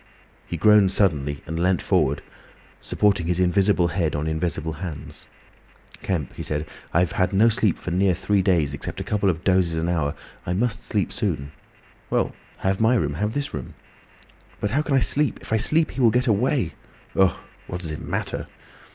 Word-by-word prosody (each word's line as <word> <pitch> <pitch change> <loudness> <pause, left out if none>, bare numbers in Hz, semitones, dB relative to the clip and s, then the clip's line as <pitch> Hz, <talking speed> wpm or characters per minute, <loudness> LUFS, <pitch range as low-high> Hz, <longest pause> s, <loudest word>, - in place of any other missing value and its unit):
He 85 - -4
groaned 105 +1 +5
suddenly 75 -8 +1
and 80 +1 -4
leant 90 0 +2
forward, 70 +2 +1 0.6
supporting 100 -5 +1
his 90 0 0
invisible 90 -1 +3
head 85 -4 -1
on 75 +1 -2
invisible 80 0 -2
hands. 85 -6 -7 0.7
"Kemp," 85 -8 -2
he - - -8
said, 75 0 -2 0.3
"I've 90 +1 +2
had 95 +1 0
no 110 +4 +5
sleep 110 -4 +1
for 90 - -6
near 95 +1 +2
three 100 +3 +1
days, 85 -7 +2
except 70 - -6
a - - -3
couple 100 -2 +1
of 90 0 -2
dozes 90 -3 +2
of 80 - -1
an 85 - 0
hour 85 -4 +1
or 70 - -4
so. - - -18 0.2
I 90 - 0
must 110 +3 -1
sleep - - -1
soon." 70 +1 -2 0.6
"Well, - - 0 0.2
have 95 +2 -1
my 115 +3 +4
room—have 105 +3 -1
this 145 -1 -2
room." - - -6 0.8
"But 105 - -1
how 140 +6 +2
can 150 -2 0
I - - +5
sleep? 145 -2 +2
If - - -6
I - - +4
sleep—he 150 +3 +2
will 120 - +6
get 125 +3 +2
away. 115 - +1 0.4
Ugh! 95 -2 +4 0.3
What 90 0 -5
does 80 -3 -4
it 75 - -6
matter?" - - -3
90 Hz, 190 wpm, -23 LUFS, 80-105 Hz, 0.8 s, will